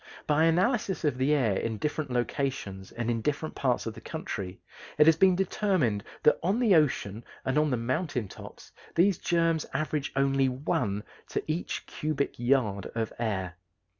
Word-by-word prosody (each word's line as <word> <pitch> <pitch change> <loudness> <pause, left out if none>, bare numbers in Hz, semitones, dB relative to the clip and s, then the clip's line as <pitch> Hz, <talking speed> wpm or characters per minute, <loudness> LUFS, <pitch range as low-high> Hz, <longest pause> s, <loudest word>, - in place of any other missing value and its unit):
By 155 +2 +3
analysis 190 +4 +1
of 130 -4 0
the 135 +3 +2
air 115 -9 +2
in 110 +2 -2
different 150 +5 -2
locations 120 -6 -2
and 120 0 -2
in 115 -1 -1
different 150 +4 -2
parts 125 -3 0
of 115 - -3
the - - -11
country 100 - -5 0.4
it 150 - +7
has 160 0 +7
been 185 +2 +5
determined 180 - +1 0.2
that 150 - +5
on 190 +6 +1
the 230 -6 +4
ocean 120 - +2 0.2
and 130 - 0
on 155 0 +2
the 125 - +1
mountain 125 - -1
tops - - -12 0.2
these 185 +2 +4
germs 165 -3 +1
average 150 -2 -1
only 135 -1 +3
one 125 - -1 0.2
to - - -2
each 155 +3 -3
cubic 150 -4 -2
yard 120 -6 +1
of 115 -1 -2
air. 95 -6 -2
140 Hz, 165 wpm, -28 LUFS, 115-160 Hz, 0.4 s, it